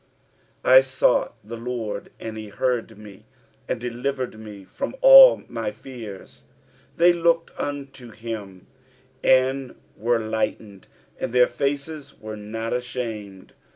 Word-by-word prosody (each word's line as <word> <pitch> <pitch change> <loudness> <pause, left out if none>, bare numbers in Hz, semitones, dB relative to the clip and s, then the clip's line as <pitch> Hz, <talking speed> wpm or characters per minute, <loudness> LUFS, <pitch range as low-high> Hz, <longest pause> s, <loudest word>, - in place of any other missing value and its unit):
4 - - +2
I 130 0 +10
sought 130 0 +1
the 115 +3 -8
LORD, 115 -4 -5
and 110 -1 -6
he 110 -1 -7
heard 115 -1 -2
me, 105 -2 -14 0.4
and 125 - -1
delivered 125 0 -4
me 105 -3 -10
from 275 - -5
all - - +9
my - - -3
fears. 115 - -11 0.2
5 - - -32
They 175 +1 +6
looked 165 -1 +1
unto 135 -3 -6
him, 105 -4 -8 0.6
and 130 0 +2 0.2
were 120 +2 +1
lightened: 110 -2 -4 0.3
and 125 - -3
their 125 0 +5
faces 145 +2 -4
were 110 0 -7
not 110 +2 -5
ashamed. 115 -6 -5
120 Hz, 130 wpm, -23 LUFS, 110-135 Hz, 0.6 s, I